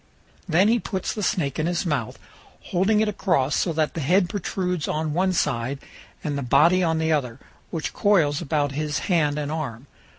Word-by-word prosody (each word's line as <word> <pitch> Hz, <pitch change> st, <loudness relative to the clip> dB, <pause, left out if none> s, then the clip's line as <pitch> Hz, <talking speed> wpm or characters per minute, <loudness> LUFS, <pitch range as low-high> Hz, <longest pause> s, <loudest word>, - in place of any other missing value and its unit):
Then 175 Hz, +5 st, +4 dB
he 235 Hz, +2 st, +3 dB
puts 190 Hz, -3 st, -3 dB
the 215 Hz, -, -4 dB
snake 160 Hz, -7 st, -1 dB
in 155 Hz, -, 0 dB
his 175 Hz, +1 st, -1 dB
mouth, 145 Hz, -9 st, -2 dB, 0.5 s
holding 195 Hz, +4 st, +3 dB
it 220 Hz, -, +2 dB
across, 170 Hz, -9 st, +1 dB
so 175 Hz, -, +1 dB
that 155 Hz, -1 st, 0 dB
the 165 Hz, -, -4 dB
head 175 Hz, +5 st, +2 dB
protrudes 180 Hz, -4 st, -2 dB
on 155 Hz, 0 st, -1 dB
one 185 Hz, +3 st, +2 dB
side 130 Hz, -6 st, -1 dB, 0.5 s
and 150 Hz, -2 st, -2 dB
the 140 Hz, -, -2 dB
body 155 Hz, +8 st, +4 dB
on 165 Hz, -2 st, +1 dB
the 160 Hz, 0 st, 0 dB
other, 130 Hz, -5 st, -1 dB, 0.3 s
which 160 Hz, -2 st, -4 dB
coils 170 Hz, -8 st, +2 dB
about 145 Hz, -3 st, 0 dB
his 150 Hz, +1 st, -2 dB, 0.2 s
hand 150 Hz, -3 st, +2 dB
and 150 Hz, 0 st, -3 dB
arm. 140 Hz, -6 st, -4 dB
160 Hz, 190 wpm, -24 LUFS, 145-180 Hz, 0.5 s, Then